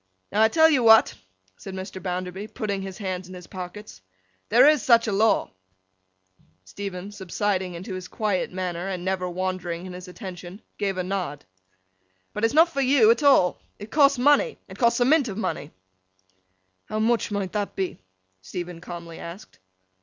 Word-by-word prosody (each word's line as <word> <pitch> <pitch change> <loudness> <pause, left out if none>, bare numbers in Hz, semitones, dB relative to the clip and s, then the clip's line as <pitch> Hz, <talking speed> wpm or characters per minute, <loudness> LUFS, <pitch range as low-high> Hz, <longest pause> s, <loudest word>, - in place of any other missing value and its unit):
'Now, 210 - +2
I 220 - +7
tell 320 +7 +5
you 290 -5 +3
what!' 225 -1 +6 0.4
said 190 - -8
Mr. 190 0 -7
Bounderby, 185 +2 -4
putting 205 -2 -3
his 190 -1 -7
hands 185 -3 -4
in 185 - -10
his 180 -1 -10
pockets. 185 - -9 0.5
'There 245 +5 +7
is 300 -3 +5
such 230 0 +5
a 220 - -1
law.' 215 +3 +2 1.1
Stephen, 195 - -6
subsiding 190 -1 -2
into 185 +4 -7
his 185 -1 -6
quiet 205 -1 -1
manner, 180 -1 -3
and 185 -2 -4
never 185 -1 -1
wandering 180 -1 -3
in 185 - -8
his 180 +1 -9
attention, 180 0 -9 0.2
gave 195 -2 -1
a 185 - -1
nod. 180 -6 -4 0.9
'But 210 - -4
it's 225 +4 +2
not 325 +2 +6
for 275 -4 -2
you 255 -4 +5
at 235 - +1
all. 270 - +4 0.2
It 205 +1 -10
costs 280 -2 +5
money. 290 - +3
It - - -12
costs 235 -1 +3
a 245 - +3
mint 285 0 +4
of 200 -3 -5
money.' 150 -9 -3 1.2
'How 215 - -4
much 225 +2 +1
might 200 -3 -3
that 205 -1 -3
be?' 190 - -3 0.4
Stephen 175 - -7
calmly 170 -2 -8
asked. 180 +6 -10
195 Hz, 175 wpm, -25 LUFS, 180-225 Hz, 1.2 s, I